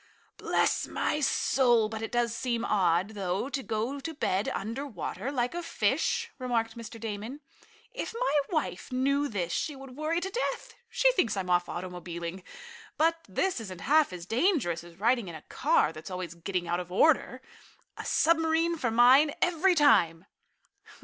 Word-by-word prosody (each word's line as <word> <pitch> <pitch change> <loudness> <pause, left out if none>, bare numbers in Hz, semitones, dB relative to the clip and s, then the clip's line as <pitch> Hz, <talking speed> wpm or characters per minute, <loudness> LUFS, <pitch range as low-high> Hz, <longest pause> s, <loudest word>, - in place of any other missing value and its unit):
"Bless - - +1
my 300 - -1
soul, 250 -5 +3
but 220 0 -6
it 225 - -4
does 240 -1 +1
seem 235 -1 -1
odd, 185 -1 +2
though, 200 +3 -2
to 280 -1 -2
go 235 +4 -2
to 320 +4 -5
bed 195 -8 0
under 230 +7 -4
water, 240 - -5
like 250 -1 -1
a 345 - -3
fish," 460 +7 0
remarked 230 -3 -1
Mr. 230 0 -9
Damon. 220 +5 -5 0.5
"If - - -5
my - - +2
wife 310 -5 -2
knew 275 +3 +1
this 180 -8 -3
she 300 - -2
would 270 -1 -11
worry 310 +3 -1
to 380 +2 -4
death. 485 +5 -3 0.2
She - - +3
thinks 245 - 0
I'm 185 -2 -2
off 175 0 +2
automobiling. 175 0 -6 0.6
But 330 +1 +2
this 335 - 0
isn't 185 -5 -8
half 300 - +3
as 175 -2 -7
dangerous 225 - +1
as 170 +1 -15
riding 235 0 +2
in 170 - -7
a 155 - -10
car 155 - +1
that's 155 +2 -9
always 180 -3 -5
getting 175 +1 -3
out 175 +1 0
of 180 0 -7
order. 260 - +3 0.6
A - - -7
submarine 325 +1 +2
for 250 -6 -1
mine, 255 +6 +5
every 360 +1 +3
time." 190 - +4
235 Hz, 170 wpm, -29 LUFS, 185-300 Hz, 0.6 s, mine